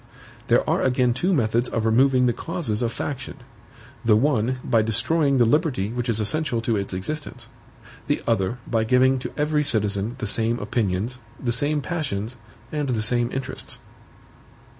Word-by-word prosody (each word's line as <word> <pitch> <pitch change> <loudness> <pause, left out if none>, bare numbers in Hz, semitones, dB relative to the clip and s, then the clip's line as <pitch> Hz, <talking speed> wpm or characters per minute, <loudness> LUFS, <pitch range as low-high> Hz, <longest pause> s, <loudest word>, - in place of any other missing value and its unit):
There - - +3
are - - +2
again 125 -1 +2
two 180 +10 0
methods 120 -6 +1
of 115 -1 -1
removing 125 +3 +4
the 120 - +3
causes 160 - -2
of 115 -1 0
faction: 130 0 -5 0.7
the 115 -2 +5
one, 125 0 +2
by 115 -3 +3
destroying 140 +6 +2
the 120 - +5
liberty 125 - +1
which 120 0 -2
is 110 -1 +1
essential 125 +3 0
to 115 0 0
its 100 -1 -2
existence; 145 +12 -5 0.6
the - - 0
other, 115 0 0
by 115 -2 0
giving 130 +3 +3
to - - -5
every 150 0 +1
citizen 105 -2 0
the 120 - -4
same 115 +3 0
opinions, 110 +2 -1 0.2
the 120 - -1
same 145 +4 0
passions, 130 - -3 0.4
and 150 -3 -2
the 115 -4 0
same 120 +2 +2
interests. 135 0 -5
120 Hz, 160 wpm, -24 LUFS, 110-140 Hz, 0.7 s, the